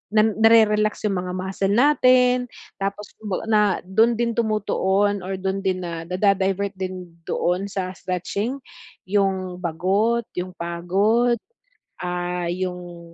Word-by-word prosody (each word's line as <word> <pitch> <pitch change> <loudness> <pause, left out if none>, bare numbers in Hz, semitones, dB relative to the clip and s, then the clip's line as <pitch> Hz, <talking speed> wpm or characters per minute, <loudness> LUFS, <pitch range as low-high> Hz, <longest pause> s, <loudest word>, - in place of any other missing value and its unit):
na-re-relax 215 -1 +4
'yung 195 -3 -1
mga 180 0 -4
muscle 195 +1 -1
natin, 255 -2 +4 0.3
tapos 200 +1 -3
'baga 210 -2 -4
na 215 -1 +5 0.2
dun 220 +6 +3
din 235 +1 0
tumutuon 205 -2 +1
or 190 - -3
dun 190 +1 -2
din 185 -1 0
nadi-divert 190 +3 0
din 185 -1 -5 0.2
doon 180 +3 0
sa 190 -2 -3
stretching 195 +8 -3 0.5
'yung 190 -2 0
bagot, 195 +7 +1
'yung 180 +1 -3
pagod, 195 +8 +1 0.7
ah, 180 -1 -2
'yung 175 -2 -6
195 Hz, 115 wpm, -23 LUFS, 180-215 Hz, 0.7 s, na